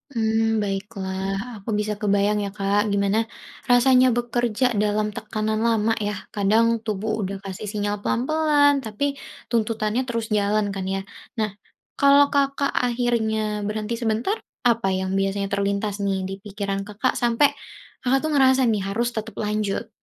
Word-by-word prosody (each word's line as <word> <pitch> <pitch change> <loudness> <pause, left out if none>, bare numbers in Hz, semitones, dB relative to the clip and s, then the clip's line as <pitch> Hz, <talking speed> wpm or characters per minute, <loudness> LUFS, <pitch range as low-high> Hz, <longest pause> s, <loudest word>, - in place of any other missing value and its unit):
Mmm, 225 0 +1
baiklah 195 -1 -3 0.2
aku - - -7
bisa 210 0 -1
kebayang 205 0 +2
ya, 200 - -2
Kak, 200 +1 +2
gimana 200 +1 +1 0.5
rasanya 255 +1 +6
bekerja 240 0 0 0.2
dalam 210 0 +1
tekanan 215 -1 -2
lama 225 0 +2
ya - - 0 0.2
kadang 210 +3 +3 0.2
tubuh 215 0 -2
udah 195 +1 -3
kasih 190 +1 -6
sinyal 205 -1 -1
pelan-pelan 290 +3 +3
tapi 280 +7 -2 0.3
tuntutannya 225 0 0
terus 230 -1 -2
jalan 205 +1 +1
kan 190 - -3
ya. - - -1 0.4
Nah 215 -1 +1 0.5
kalau 280 0 +6
Kakak 275 0 +1 0.2
akhirnya 235 -3 0 0.3
berhenti 215 +2 -2
sebentar 230 - 0 0.3
apa 230 -4 +2
yang 190 0 -2
biasanya 195 0 -1
terlintas 200 +1 0
nih 195 -1 +1
dipikiran 195 0 -4
Kakak 210 +5 -1
sampai 240 +4 +4 0.6
Kakak 265 +2 +3
tuh 310 - -1
ngerasa 265 -1 +5
nih 215 -3 +1
harus 235 +4 0
tetap 220 -1 -5
lanjut? 210 +1 -2
215 Hz, 140 wpm, -23 LUFS, 200-240 Hz, 0.6 s, rasanya